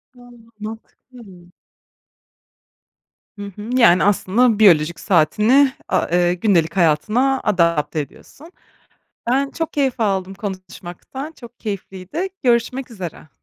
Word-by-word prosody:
A, 245 Hz, 0 st, -16 dB, 0.3 s
mantıklı. 225 Hz, +3 st, -10 dB, 2.1 s
Hı 205 Hz, -1 st, -7 dB
hı, 210 Hz, +2 st, -8 dB
yani 185 Hz, -8 st, +5 dB
aslında 205 Hz, +3 st, +2 dB
biyolojik 170 Hz, -5 st, +4 dB
saatini 210 Hz, -, +3 dB, 0.2 s
a -, -, 0 dB
eee, 175 Hz, 0 st, +3 dB
gündelik 180 Hz, -3 st, +1 dB
hayatına 215 Hz, -, +2 dB
adapte 170 Hz, -4 st, +1 dB
ediyorsun. 285 Hz, -, -10 dB, 0.8 s
Ben 275 Hz, +2 st, +1 dB
çok 325 Hz, -1 st, -4 dB
keyif 270 Hz, -4 st, 0 dB
aldım 195 Hz, -3 st, -1 dB
konuşmaktan 195 Hz, -, -8 dB
çok 240 Hz, -6 st, -15 dB
keyifliydi 200 Hz, -, -5 dB, 0.2 s
görüşmek 245 Hz, +1 st, 0 dB
üzere. 175 Hz, -7 st, -8 dB
210 Hz, 105 wpm, -20 LUFS, 180-250 Hz, 2.1 s, yani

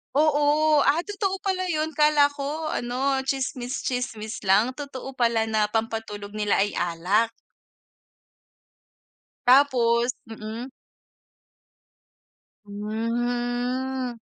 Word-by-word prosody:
Oo, 300 Hz, 0 st, +4 dB
ah, 285 Hz, +4 st, +3 dB
totoo 395 Hz, -2 st, -2 dB
pala 375 Hz, -2 st, -1 dB
yun? 310 Hz, 0 st, 0 dB
Akala 300 Hz, -1 st, +5 dB
ko 300 Hz, +3 st, -3 dB
ano 265 Hz, +1 st, -1 dB
tsismis 260 Hz, -1 st, -2 dB
tsismis 225 Hz, -4 st, -4 dB
lang 210 Hz, +6 st, +3 dB
totoo 270 Hz, -2 st, -7 dB
pala 230 Hz, -2 st, +2 dB
na 215 Hz, -1 st, +1 dB
pampatulog 220 Hz, -2 st, -3 dB
nila 210 Hz, -1 st, +1 dB
ay 205 Hz, +1 st, +1 dB
alak. 180 Hz, +7 st, +1 dB, 2.2 s
Tapos 245 Hz, -2 st, +4 dB, 0.2 s
mm. 225 Hz, +3 st, -7 dB, 2.0 s
Hmm. 245 Hz, +4 st, -2 dB
245 Hz, 90 wpm, -25 LUFS, 220-285 Hz, 2.2 s, Akala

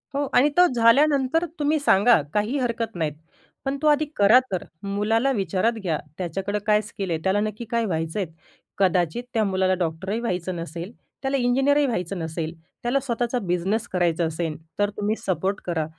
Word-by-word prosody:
हो 285 Hz, 0 st, 0 dB
आणि 285 Hz, +4 st, +5 dB
तो 360 Hz, -, +8 dB
झाल्यानंतर 275 Hz, +6 st, +4 dB
तुम्ही 300 Hz, +1 st, +2 dB
सांगा. 225 Hz, -, +5 dB
काही 210 Hz, +7 st, 0 dB
हरकत 235 Hz, -3 st, -2 dB
नाहीत 160 Hz, -4 st, -1 dB, 0.5 s
पण 270 Hz, +1 st, -1 dB
तो 310 Hz, -, +2 dB
आधी 300 Hz, +1 st, +4 dB
करा 210 Hz, +5 st, +7 dB
तर. 185 Hz, -, -2 dB, 0.2 s
मुलाला 215 Hz, +6 st, +1 dB
विचारात 195 Hz, 0 st, 0 dB
घ्या, 165 Hz, -6 st, -1 dB, 0.2 s
त्याच्याकडं 190 Hz, +3 st, -2 dB
काय 210 Hz, 0 st, +4 dB
स्किल 200 Hz, -3 st, -6 dB
आहे? 165 Hz, -, -1 dB
त्याला 190 Hz, +2 st, +2 dB
नक्की 215 Hz, +2 st, -3 dB
काय 230 Hz, -1 st, +1 dB
व्हायचंय? 165 Hz, +2 st, -2 dB, 0.5 s
कदाचित 180 Hz, +3 st, +1 dB
त्या 225 Hz, -, +2 dB
मुलाला 190 Hz, -2 st, +1 dB
डॉक्टरही 180 Hz, +5 st, -2 dB
व्हायचं 185 Hz, -5 st, -2 dB
नसेल, 170 Hz, +3 st, -6 dB, 0.3 s
त्याला 270 Hz, 0 st, 0 dB
इंजिनिअरही 270 Hz, +4 st, +3 dB
व्हायचं 195 Hz, -6 st, -2 dB
नसेल. 160 Hz, 0 st, -4 dB, 0.3 s
त्याला 245 Hz, +3 st, +2 dB
स्वतःचा 245 Hz, -1 st, -1 dB
बिझनेस 195 Hz, +3 st, -1 dB
करायचा 175 Hz, -2 st, +1 dB
असेन, 160 Hz, 0 st, -2 dB, 0.2 s
तर 205 Hz, 0 st, +3 dB
तुम्ही 210 Hz, +1 st, 0 dB
सपोर्ट 195 Hz, -1 st, -1 dB
करा. 165 Hz, -3 st, -1 dB
205 Hz, 165 wpm, -24 LUFS, 180-245 Hz, 0.5 s, तो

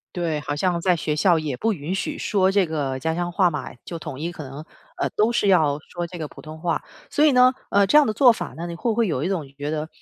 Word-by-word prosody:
对， 165 Hz, -4 st, -1 dB
好 145 Hz, 0 st, -4 dB
像 175 Hz, +1 st, 0 dB
在 180 Hz, 0 st, +2 dB
学 155 Hz, -1 st, -2 dB
校 170 Hz, +2 st, +3 dB
也 150 Hz, -5 st, -3 dB
不 225 Hz, -, 0 dB
允 165 Hz, 0 st, -4 dB
许 195 Hz, -, -3 dB
说 190 Hz, -2 st, +2 dB
这 195 Hz, -2 st, +3 dB
个 140 Hz, -4 st, -2 dB
家 160 Hz, +4 st, -1 dB
乡 175 Hz, +1 st, -2 dB
话 180 Hz, 0 st, +3 dB
嘛， 155 Hz, -, -5 dB
就 170 Hz, -, -6 dB
统 150 Hz, -4 st, -7 dB
一 170 Hz, +3 st, -3 dB
可 160 Hz, -, -8 dB
能， 140 Hz, +3 st, -8 dB, 0.3 s
呃， -, -, 0 dB
都 215 Hz, +2 st, +3 dB
是 235 Hz, -3 st, +1 dB
要 155 Hz, -7 st, +3 dB
说 175 Hz, +3 st, -6 dB
这 175 Hz, 0 st, -9 dB
个 155 Hz, -, -3 dB
普 -, -, -13 dB
通 155 Hz, 0 st, -9 dB
话。 170 Hz, -1 st, -1 dB, 0.3 s
所 300 Hz, -, +3 dB
以 305 Hz, -, +6 dB
呢， 250 Hz, 0 st, +6 dB, 0.2 s
呃， 200 Hz, -1 st, +4 dB
这 295 Hz, -, +4 dB
样 300 Hz, -, +7 dB
的 215 Hz, -, +1 dB
做 250 Hz, 0 st, +6 dB
法 -, -, -5 dB
呢， 170 Hz, +2 st, -5 dB
你 170 Hz, -, -5 dB
会 230 Hz, +8 st, -1 dB
不 220 Hz, -, -1 dB
会 235 Hz, -2 st, +3 dB
有 145 Hz, -6 st, -1 dB
一 170 Hz, -, 0 dB
种 180 Hz, -7 st, -2 dB
觉 145 Hz, +1 st, -4 dB
得， 155 Hz, 0 st, -3 dB
170 Hz, 305 characters per minute, -23 LUFS, 155-195 Hz, 0.3 s, 样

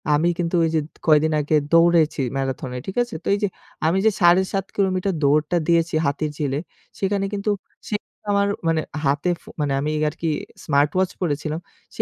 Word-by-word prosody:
আমি 165 Hz, +4 st, +2 dB
কিন্তু 170 Hz, 0 st, 0 dB
ওই 165 Hz, -, +2 dB
যে 155 Hz, -, +3 dB, 0.3 s
কয়দিন 155 Hz, 0 st, +4 dB
আগে 150 Hz, +2 st, +1 dB, 0.2 s
দৌড়েছি 165 Hz, -3 st, +4 dB, 0.2 s
ম্যারাথনে, 130 Hz, -1 st, -3 dB
ঠিক 190 Hz, -, -5 dB
আছে। 240 Hz, -, -9 dB
তো -, -, -7 dB
এই -, -, -4 dB
যে -, -, +4 dB, 0.4 s
আমি 170 Hz, +4 st, +2 dB
যে 220 Hz, -, +6 dB
৭.৫ 190 Hz, +2 st, +4 dB
কিলোমিটার 190 Hz, -1 st, +1 dB
দৌড়টা 150 Hz, +4 st, +3 dB
দিয়েছি 165 Hz, -1 st, +2 dB
হাতির 150 Hz, +2 st, -1 dB
ঝিলে, 140 Hz, -2 st, -1 dB, 0.4 s
সেখানে 195 Hz, 0 st, 0 dB
কিন্তু 205 Hz, +1 st, 0 dB, 0.4 s
সে 210 Hz, -, -1 dB, 0.4 s
আমার 200 Hz, 0 st, +3 dB, 0.6 s
হাতে 145 Hz, +5 st, +1 dB
ফো -, -, -15 dB
মানে 145 Hz, -2 st, 0 dB
আমি 150 Hz, +2 st, -1 dB, 0.2 s
আরকি 160 Hz, +2 st, -3 dB, 0.4 s
স্মার্টওয়াচ 150 Hz, +6 st, +2 dB
পড়েছিলাম। 155 Hz, -1 st, -1 dB, 0.4 s
সে -, -, 0 dB
165 Hz, 165 wpm, -22 LUFS, 150-190 Hz, 0.6 s, যে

